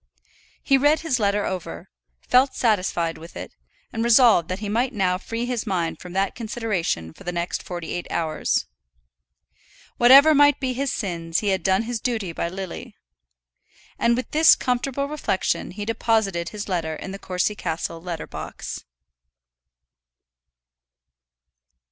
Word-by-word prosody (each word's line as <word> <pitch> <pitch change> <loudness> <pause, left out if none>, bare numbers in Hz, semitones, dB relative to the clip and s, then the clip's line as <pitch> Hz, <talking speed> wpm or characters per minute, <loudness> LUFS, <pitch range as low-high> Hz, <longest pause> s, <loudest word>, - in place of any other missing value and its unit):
He 270 -1 +4
read 295 +3 +3
his 275 -7 0
letter 205 -1 +1
over, 165 - -6 0.4
felt 260 +2 +4
satisfied 185 -7 0
with 165 +2 -11
it, - - -7 0.4
and 225 - -1
resolved 235 -7 +5
that 185 - -2
he 205 +1 -5
might 240 +5 0
now 185 -4 +1
free 230 +4 -4
his 245 -2 -3
mind 175 -4 -1
from 180 -1 -9
that 195 +1 0
consideration 210 - -3
for - - -15
the 180 - -3
next 175 0 -3
forty 175 -2 -6
eight 175 - -4
hours. 160 -2 -1 1.3
Whatever 275 +6 +8
might 290 -1 +5
be 260 -2 -1
his 275 +2 -1
sins 170 -5 -2
he 210 - 0
had 190 -1 +1
done 190 +4 +2
his 235 0 -3
duty 220 -8 -2
by 170 - -3
Lily! 190 0 -7 1.0
And 235 0 +3
with 255 - -4
this 315 +1 +7
comfortable 255 +2 -1
reflection 290 -10 -1
he 205 +2 -6
deposited 215 -6 0
his 210 -1 -6
letter 165 -4 -2
in 190 - -7
the 195 - -7
Courcy 185 +2 -1
Castle 165 -3 -4
letter 170 -2 -5
box. - - -7
205 Hz, 150 wpm, -23 LUFS, 175-245 Hz, 1.3 s, Whatever